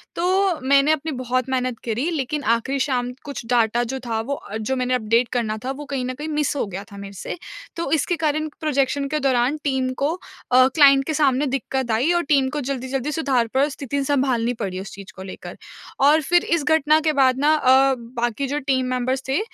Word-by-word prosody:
तो 370 Hz, 0 st, +1 dB
मैंने 280 Hz, +2 st, +5 dB
अपनी 315 Hz, 0 st, -1 dB
बहुत 255 Hz, 0 st, -2 dB
मेहनत 255 Hz, -2 st, -1 dB
करी 240 Hz, +8 st, -1 dB
लेकिन 295 Hz, -1 st, -2 dB
आखिरी 235 Hz, +4 st, 0 dB
शाम 250 Hz, -2 st, 0 dB
कुछ 280 Hz, -5 st, -6 dB
डाटा 235 Hz, 0 st, +2 dB
जो 265 Hz, +3 st, -4 dB
था 225 Hz, -1 st, -1 dB
वो 275 Hz, +5 st, -3 dB
अ, 215 Hz, -5 st, -7 dB
जो 220 Hz, +4 st, -2 dB
मैंने 255 Hz, 0 st, -1 dB
अपडेट 230 Hz, 0 st, +2 dB
करना 220 Hz, -3 st, -1 dB
था 265 Hz, -, -1 dB
वो 290 Hz, +2 st, -7 dB
कहीं 270 Hz, -3 st, -3 dB
न 255 Hz, -, -3 dB
कहीं 300 Hz, +4 st, -6 dB
मिस 300 Hz, -2 st, -1 dB
हो 275 Hz, -, -1 dB
गया 195 Hz, +1 st, -6 dB
था 200 Hz, -, -10 dB
मेरे 200 Hz, 0 st, -8 dB
से। 200 Hz, -, -6 dB, 0.4 s
तो 335 Hz, -, -3 dB
इसके 320 Hz, +2 st, +1 dB
कारण 310 Hz, +1 st, 0 dB
प्रोजेक्शन 280 Hz, -2 st, 0 dB
के -, -, +1 dB
दौरान 260 Hz, +1 st, +1 dB
टीम 265 Hz, -2 st, 0 dB
को 300 Hz, -, +2 dB, 0.4 s
अ, 255 Hz, +1 st, +6 dB
क्लाइंट 275 Hz, -1 st, +5 dB
के 315 Hz, -, -1 dB
सामने 285 Hz, -2 st, +2 dB
दिक्कत 265 Hz, -2 st, -2 dB
आई 250 Hz, +10 st, +2 dB
और 345 Hz, 0 st, +1 dB
टीम 265 Hz, -2 st, +3 dB
को 295 Hz, -, -1 dB
जल्दी-जल्दी 265 Hz, +2 st, -3 dB
सुधार 270 Hz, -7 st, +1 dB
पर 275 Hz, +3 st, +2 dB
स्थिति 280 Hz, 0 st, -3 dB
सम्भालनी 255 Hz, -4 st, +1 dB
पड़ी 185 Hz, -2 st, -3 dB
उस 195 Hz, -, -9 dB
चीज़ 195 Hz, -1 st, -11 dB
को 190 Hz, -, -10 dB
लेकर। 190 Hz, -, -7 dB, 0.6 s
और 295 Hz, +3 st, +5 dB
फिर 350 Hz, +4 st, +2 dB
इस 335 Hz, -3 st, +1 dB
घटना 310 Hz, +1 st, +3 dB
के -, -, +1 dB
बाद 265 Hz, -2 st, +3 dB
ना 300 Hz, +2 st, +4 dB
अ, 265 Hz, -1 st, +4 dB
बाकी 240 Hz, +2 st, -3 dB
जो 290 Hz, +2 st, -2 dB
टीम 260 Hz, -2 st, 0 dB
मेंबर्स 255 Hz, +1 st, -1 dB
थे 270 Hz, -, +2 dB
265 Hz, 215 wpm, -22 LUFS, 245-290 Hz, 0.6 s, अ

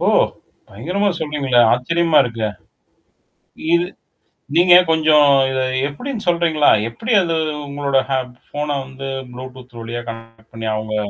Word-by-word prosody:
ஓ! -, -, 0 dB, 0.6 s
பயங்கரமா 180 Hz, -, -2 dB
சொல்றீங்களே! 140 Hz, -5 st, +1 dB
ஆச்சரியமா 165 Hz, +6 st, +2 dB
இருக்கே! 115 Hz, -3 st, -3 dB, 1.3 s
இது 170 Hz, +1 st, +3 dB, 0.7 s
நீங்க 175 Hz, +1 st, +6 dB, 0.2 s
கொஞ்சம் 155 Hz, -2 st, +4 dB, 0.3 s
இத 130 Hz, -, -1 dB, 0.3 s
எப்படின்னு 235 Hz, -, -6 dB
சொல்றீங்களா? 165 Hz, -4 st, +2 dB, 0.2 s
எப்படி 225 Hz, -, -5 dB
அது 165 Hz, -1 st, -1 dB, 0.3 s
உங்களோட 140 Hz, -1 st, -1 dB
ஹேப் 130 Hz, -2 st, -2 dB, 0.2 s
ஃபோன 150 Hz, +1 st, -4 dB, 0.2 s
வந்து 135 Hz, +1 st, -8 dB, 0.2 s
ப்ளூடூத் 125 Hz, -1 st, -11 dB
வழியா 115 Hz, +1 st, -5 dB
கனெக்ட் 115 Hz, 0 st, -12 dB
பண்ணீ 115 Hz, 0 st, -5 dB
அவுங்க 110 Hz, 0 st, -4 dB
135 Hz, 120 wpm, -19 LUFS, 120-165 Hz, 1.3 s, நீங்க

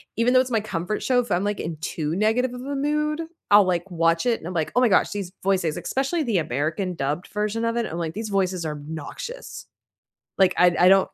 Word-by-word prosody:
even 230 Hz, +3 st, +2 dB
though 255 Hz, -, +7 dB
it's 255 Hz, 0 st, 0 dB
my 225 Hz, -2 st, +2 dB
comfort 200 Hz, 0 st, -3 dB
show, 255 Hz, -1 st, +3 dB
if 245 Hz, -, -2 dB
I'm, 175 Hz, +2 st, +2 dB
like, 205 Hz, 0 st, -1 dB
in 165 Hz, 0 st, -4 dB
too 160 Hz, -1 st, -2 dB
negative 225 Hz, +5 st, +1 dB
of 250 Hz, -, -7 dB
a 280 Hz, +2 st, -4 dB
mood, 300 Hz, +2 st, 0 dB, 0.3 s
I'll, 205 Hz, -1 st, +8 dB
like, 180 Hz, +1 st, -1 dB
watch 165 Hz, +1 st, +2 dB
it 240 Hz, -2 st, +2 dB
and 160 Hz, -, -8 dB
I'm 180 Hz, -, -5 dB
like, 160 Hz, -3 st, -1 dB
"Oh -, -, +5 dB
my 250 Hz, -, +5 dB
gosh, 195 Hz, -, +3 dB
these 200 Hz, -3 st, -4 dB
voices" 185 Hz, -5 st, +1 dB
especially 275 Hz, +5 st, -1 dB
the 230 Hz, -8 st, 0 dB
American 155 Hz, +5 st, -1 dB
dubbed 150 Hz, +4 st, -2 dB
version 210 Hz, +2 st, -2 dB
of 230 Hz, 0 st, 0 dB
it, 235 Hz, -1 st, 0 dB
I'm 165 Hz, -, -5 dB
like, 165 Hz, -2 st, -3 dB
"These 215 Hz, +3 st, -5 dB
voices 185 Hz, -3 st, 0 dB
are 155 Hz, -, -1 dB
obnoxious." 160 Hz, -, -7 dB, 0.7 s
Like, 190 Hz, -1 st, +5 dB
I 180 Hz, -1 st, +5 dB
I 180 Hz, -, +6 dB
don't 195 Hz, 0 st, +5 dB
195 Hz, 235 wpm, -24 LUFS, 170-240 Hz, 0.7 s, I'll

